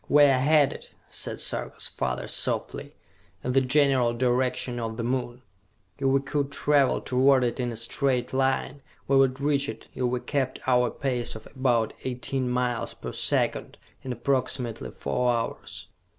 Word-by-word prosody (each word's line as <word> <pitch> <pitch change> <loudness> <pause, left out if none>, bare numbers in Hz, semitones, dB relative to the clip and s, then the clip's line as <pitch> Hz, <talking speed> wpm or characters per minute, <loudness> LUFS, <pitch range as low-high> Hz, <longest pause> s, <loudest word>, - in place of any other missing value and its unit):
"We 145 0 +7
are 135 -3 +5
headed," 145 0 +2 0.2
said - - -4
Sarka's - - -1
father 65 -1 -3
softly, - - -1 0.5
"in 125 - -1
the 135 +1 +4
general 130 -3 +3
direction 125 0 0
of 115 -1 -4
the 115 - -2
Moon! 125 0 -2 0.6
If 135 - +1
we 135 +1 +4
could 140 0 -2
travel 140 -1 +2
toward 130 +1 +3
it 120 +2 -1
in 125 -1 -1
a - - -6
straight 125 +3 -1
line, 135 +1 0 0.3
we 135 - +3
would 135 -1 +3
reach 140 0 +1
it, - - -8
if 130 - -4
we 125 0 0
kept 135 -1 -2
our 125 -1 +3
pace 125 -2 -2
of 110 - -10
about 120 -4 +1
eighteen 130 0 -2
miles 125 -1 -1
per - - -7
second, - - -1 0.2
in 130 - -5
approximately 125 -1 -2
four 125 0 0
hours! 115 -1 -4
130 Hz, 160 wpm, -26 LUFS, 120-135 Hz, 0.6 s, We